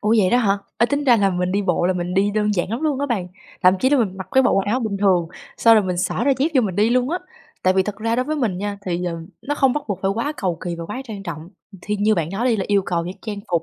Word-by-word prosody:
Ủa 215 +2 +2
vậy 185 -3 +3
đó 245 - +4
hả? 200 -4 +2 0.2
Ê, 235 - +4
tính 285 +2 -1
ra 245 -3 +6
là 200 -2 +2
mình 180 0 -1
đi 200 +1 +1
bộ 175 -2 +1
là 185 - +2
mình 180 0 -3
đi 200 +2 +2
đơn 210 0 0
giản 180 +2 -1
lắm 235 +5 -2
luôn 290 -4 0
á 285 - 0
bạn, 195 -8 -2 0.3
thậm 185 +1 +6
chí 260 - +3
là 285 - +4
mình 190 -5 0
mặc 190 -1 -7
cái 265 - +4
bộ - - +3
quần 195 - +2
áo 245 +5 +1
bình 215 -3 -2
thường, 185 -4 +2 0.3
xong 230 -1 +6
rồi 210 -3 +4
mình 180 -1 -2
xỏ 190 +6 -1
đôi 275 -1 +3
dép 290 +4 +2
vô 260 - +5
mình 195 -5 -2
đi 215 +3 +3
luôn 250 +3 +2
á. 355 - 0 0.4
Tại 185 - +4
vì 190 0 +3
thật 205 0 -5
ra 225 +2 -1
đối 255 - +1
với 310 +1 -2
mình 220 -10 -1
nha 205 0 -4
thì, 180 0 -1
ờ, 170 -1 -2 0.3
nó 290 - -2
không 270 -3 +3
bắt 295 +1 -2
buộc 200 - -2
phải 195 - +2
quá 260 +7 -1
cầu 180 -4 -2
kì 175 -1 -2
và 165 - -5
quá 210 +8 -5
trang 210 -5 -7
trọng, 165 -2 -7 0.3
thì 210 - -2
như 210 +2 +2
bạn 165 -4 -2
nói 215 +6 -1
đi 225 - +2
là 195 - -2
yêu 200 -2 +3
cầu 170 -3 -2
những 180 +2 -6
trang 210 -2 -5
phục 170 -1 +1
205 Hz, 330 wpm, -21 LUFS, 185-235 Hz, 0.4 s, ra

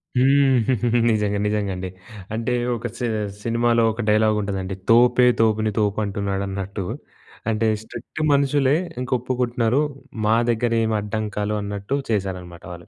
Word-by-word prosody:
హ్మ్. 135 0 +4 0.5
నిజంగా 105 -1 0
నిజంగండి. 100 -3 -2 0.4
అంటే 115 +2 -1 0.2
ఒక 120 +2 -4
సి 120 - -2 0.4
సినిమాలో 115 0 +2
ఒక 120 - -4
డైలాగ్ 110 0 +3
ఉంటదండి. 95 -1 -3 0.2
"తోపే 125 +1 +5
తోపుని 110 -1 +2
తోపు 105 0 +1
అంటున్నాడు 100 0 -2
అన్నట్టు". 100 0 -4 0.7
అంటే, 110 +1 +1
స్ట్రిక్ట్ 120 +7 -8
మనుషులే 140 0 +3 0.2
ఇంక 125 0 -5
ఒప్పుకుంటున్నారు 125 +1 0 0.4
మా 110 +1 +4
దగ్గర 115 0 +1
ఏమి 110 -1 0
అడ్డంకాలు 105 0 -3
అన్నట్టు 100 +5 -3
చేశారనమాట 90 -4 -3
వాళ్ళు. 85 -1 -10
110 Hz, 125 wpm, -22 LUFS, 100-120 Hz, 0.7 s, తోపే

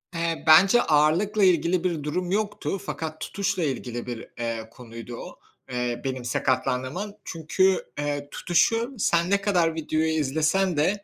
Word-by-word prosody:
Eee, 165 0 -2
bence 190 +9 +7
ağırlıkla 170 +8 +2
ilgili 180 -1 +3
bir 170 -5 -1
durum 180 +4 -2
yoktu 205 -1 -1
fakat 155 -1 -5
tutuşla 190 -3 -2
ilgili 125 -4 -3
bir, 120 -2 -6
eee, 115 -1 -3
konuydu 115 -1 -9
o, - - -10 0.3
eee, 120 -1 -2
benim 130 -2 -4
sakatlandığım 130 +3 -1
an. 205 +1 -5
Çünkü, 185 +3 +1
eee, 145 -1 -3
tutuşu 230 +9 +1
sen 170 -4 +2
ne 200 0 +2
kadar 175 -5 +2
videoyu 160 0 -1
izlesen 160 +4 +1
de 195 +7 +1
160 Hz, 145 wpm, -25 LUFS, 135-190 Hz, 0.3 s, bence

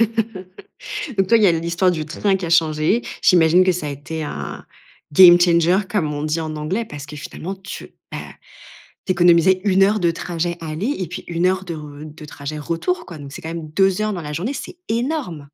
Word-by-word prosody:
Donc 215 -4 -2 0.6
toi, 230 +3 +5
il 215 - +2
y - - +7
a 175 - +6
l'histoire 170 +3 +1
du 155 -3 -3
train 195 +5 0
qui 185 -2 -3
a - - -4
changé. 165 +6 +2 0.2
J'imagine 175 -1 +5
que 185 - +3
ça 170 -4 -3
a - - -3
été 155 +3 -5
un - - -6 0.5
game 175 +2 +9
changer 175 +1 +4
comme 165 -7 0
on 145 +1 -4
dit 155 +2 -1
en 155 -1 -4
anglais, 180 +10 -2
parce 150 -7 -8
que 150 +1 -10
finalement 170 +6 -6
tu, 190 +1 -9 0.2
bah, - - -4 0.9
tu - - 0
économisais 175 +1 +4
1 195 -1 +4
heure 210 +2 +3
de 170 -3 +2
trajet 170 +1 -3
aller 165 - -2
et 185 - -2
puis 175 - -7
1 170 +1 -1
heure 190 +1 +1
de 170 - -4
re 150 -1 -9
de 155 0 -11
trajet 145 +1 -7
retour, 170 - -2
quoi. 170 -4 -9
Donc 140 -1 -10
c'est - - -8
quand 160 - -6
même 165 -2 -6
2 190 +5 +2
heures 215 0 0
dans 175 - -4
la 150 -1 -6
journée, 195 - -2
c'est 345 - -7
énorme! 235 - -2
170 Hz, 220 wpm, -20 LUFS, 155-190 Hz, 0.9 s, game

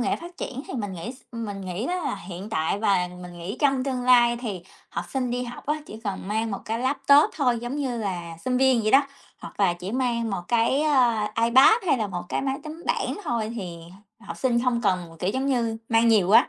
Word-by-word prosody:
nghệ 255 - +1
phát 345 +1 -11
triển 265 +2 -5
thì - - -6
mình 205 -5 -3
nghĩ 200 +8 -6 0.2
mình 210 -4 -5
nghĩ 185 +5 -4
đó 360 - -1
là - - -1
hiện 190 +2 -8
tại 160 +1 0
và 195 -4 +2
mình 175 -1 -10
nghĩ 180 +7 -5
trong 275 -3 +2
tương 260 -2 -2
lai 240 -1 +5
thì 210 -8 -5 0.3
học - - -4
sinh 255 -2 -2
đi 245 +1 -1
học 245 0 -9
á 300 - +2
chỉ - - -9
cần 195 -1 -4
mang 220 +1 -1
1 195 - -3
cái 225 +1 -2
laptop 275 +3 +4
thôi 250 -5 +2
giống 240 +4 -4
như 260 -5 -2
là 175 -6 -4
sinh 255 -1 +1
viên, 260 -4 +4
vậy 215 - +1
đó, 275 +1 +5 0.3
hoặc - - -9
là 190 -3 +4
chỉ 180 +3 -6
mang 235 -3 0
1 195 -3 -3
cái, 240 +5 +2
à, 240 -8 +2
iPad 260 - +7
hay 275 - +4
là 215 - 0
1 180 -3 -5
cái - - -1
máy 270 0 -1
tính 315 +2 -8
bảng - - 0
thôi, 230 -6 -1
thì 180 -6 -6 0.4
học - - -8
sinh 240 -2 +1
không 245 -2 +1
cần, 180 -4 -1
kiểu, 185 - 0
giống 260 +5 -1
như 235 -4 0
mang 230 0 +4
nhiều 205 -5 +4
á, 220 - +7
230 Hz, 235 wpm, -25 LUFS, 200-260 Hz, 0.4 s, iPad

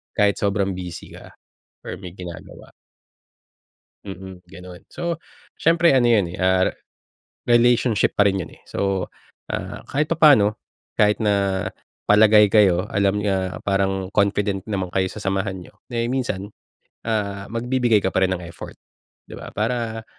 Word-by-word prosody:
Kahit 105 -2 +2
sobrang 100 -1 0
busy 90 -2 -8
ka - - -14 0.5
or - - -7
may 90 -2 -10
ginagawa. 90 -3 -10 1.3
Mm, 95 -2 -9
gano'n. 90 0 -12
So, 170 -2 -3 0.4
siyempre 165 -1 +4
ano 125 - +4
yun, 110 -7 +3
eh, 85 - -8
ah, 95 0 +2
re - - -10 0.8
relationship 120 -2 +2
pa 105 - +5
rin 95 -1 +1
yun, 85 - -6
eh. - - -20
So, 95 -2 -1 0.4
ah, - - -5
kahit 150 +2 0
papaano 145 -11 +5 0.4
kahit 105 0 +3
na 100 -3 0 0.4
palagay 105 0 +6
kayo, 95 -3 +4
alam 100 +1 +1
niyo, 100 -1 0 0.2
ah, - - -8
parang 95 -1 0
confident 100 -1 +1
naman 95 -3 -2
kayo 95 -1 +1
sa - - -8
samahan 95 -1 -2
niyo, 90 - -14 0.2
eh, 115 -1 -1
minsan, 120 -6 -2 0.6
ah, 100 -3 -2
magbibigay 120 -1 +1
ka 95 - -1
pa 95 - +2
rin 95 - +3
ng 85 - -9
effort, 85 -1 -10 0.5
'di - - -11
ba? - - -9
Para 115 0 -2
100 Hz, 150 wpm, -22 LUFS, 95-115 Hz, 1.3 s, palagay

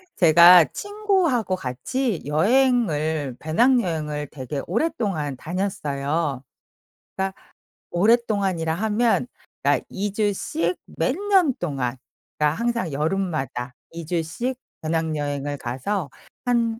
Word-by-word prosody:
제가 170 0 +8
친구하고 375 - 0
같이 185 - -2
여행을 160 - +2
배낭여행을 160 - +1
되게 140 0 -5
오랫동안 200 - -1
다녔어요. 150 -5 -2 0.7
그러니까 190 0 -1 0.6
오랫동안이라 195 -5 +2
하면 220 +5 +1 0.4
그러니까 - - +2
2 200 +1 -3
주씩 195 -5 -1
몇 165 +11 -1
년 385 -7 +3
동안 135 -7 -2 0.4
그니까 150 -1 +2
항상 235 -8 -1
여름마다 150 -6 -2 0.2
2 165 -1 -7
주씩 175 +10 -2 0.3
배낭여행을 145 -3 -2
가서 135 +7 -3 0.4
한 230 -2 +1
175 Hz, 240 characters per minute, -23 LUFS, 150-230 Hz, 0.7 s, 제가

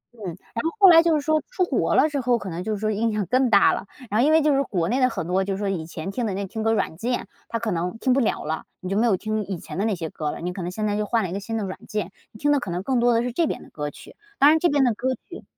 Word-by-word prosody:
嗯， 215 - -9
然 190 +6 -7
后 325 - +1
后 390 -2 +9
来 330 -1 +8
就 330 -2 +3
是 295 - +1
说 310 0 +2
出 380 -7 0
国 - - 0
了 - - +5
之 285 -3 -2
后， 245 -1 +2
可 205 - -7
能 170 +2 -4
就 220 - -3
是 - - -2
说 215 0 0
影 225 +2 0
响 210 -2 -1
更 255 +6 +2
大 200 -2 +5
了， 200 - -5 0.2
然 215 +3 +3
后 - - +4
因 310 - +4
为 320 -1 +5
就 300 -2 +3
是 275 - +3
国 175 -9 -1
内 250 +6 0
的 255 - +4
很 160 - -4
多 185 +2 +1
就 195 0 -2
是 - - -5
说 205 - -1
以 165 -5 -3
前 165 +3 -6
听 235 +2 -2
的 195 - -2
那 200 0 -3
听 220 +4 -5
歌 225 +1 +2
软 160 - -1
件， 240 +6 -2 0.2
它 230 - -1
可 220 -2 -2
能 180 +4 -2
听 255 +2 +2
不 270 - +3
了 235 - 0
了， 160 +1 -3 0.2
你 185 - -6
就 195 - -1
没 235 +2 +3
有 195 -5 +3
听 215 +1 -2
以 190 -3 -4
前 - - -9
的 210 - +1
那 215 -4 +1
些 165 -2 -5
歌 150 -1 -3
了， - - -7
你 180 +1 -3
可 190 - -6
能 175 - -3
现 215 +2 -3
在 205 -1 0
就 210 - 0
换 225 +1 +1
了 180 - -3
一 - - -4
个 195 - -2
新 225 +2 -4
的 215 - -2
软 185 - -6
件， 210 -4 -3 0.2
你 215 - -14
听 290 0 +2
的 290 - +3
可 200 - -6
能 175 +2 -3
更 255 +2 +1
多 240 +1 +4
的 230 +1 +2
是 250 - -2
这 330 +5 +1
边 - - -4
的 - - -17
歌 150 -1 -4
曲， - - -14 0.2
当 285 +2 +7
然 320 - +4
这 350 - +3
边 285 -1 +3
的 245 -3 +3
歌 260 +5 -2 0.2
曲 360 - -10
215 Hz, 385 characters per minute, -24 LUFS, 190-255 Hz, 0.2 s, 后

